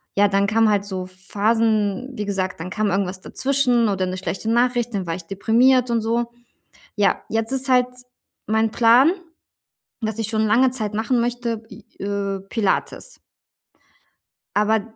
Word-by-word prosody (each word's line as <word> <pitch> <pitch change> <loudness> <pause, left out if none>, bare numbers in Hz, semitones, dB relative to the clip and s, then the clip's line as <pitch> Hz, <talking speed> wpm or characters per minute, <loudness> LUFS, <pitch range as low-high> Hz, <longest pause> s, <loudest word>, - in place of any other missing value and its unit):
Ja, 205 +1 +5
dann 200 0 +2
kamen 220 +1 +3
halt 205 -1 +1
so 185 -2 -5
Phasen, 215 +4 0
wie 210 -4 -4
gesagt, 190 -3 -2
dann 180 - -5
kam 210 +1 -1
irgendwas 190 -1 -2
dazwischen 250 -5 +1
oder 190 -2 0
'ne 185 +1 -4
schlechte 195 +3 -4
Nachricht, 240 0 +1
dann 190 -3 -3
war 165 - -2
ich 180 - -8
deprimiert 240 +7 +3
und 230 -1 +1
so. 235 +1 -1 0.6
Ja, 205 -1 +1
jetzt 225 +2 -1
ist 265 0 -1
halt 250 -1 +4 0.6
mein 220 +1 +2
Plan, 240 +7 +5 0.9
was 220 0 -3
ich 220 -1 -2
schon 220 -1 0
lange 250 +5 +4
Zeit 215 -5 -2
machen 230 +3 +1
möchte, 235 -2 -2
i 205 +1 -13 0.2
äh, 200 -1 -2
Pilates. 225 - -2 1.4
Aber 210 +1 +2
220 Hz, 155 wpm, -22 LUFS, 200-235 Hz, 1.4 s, Ja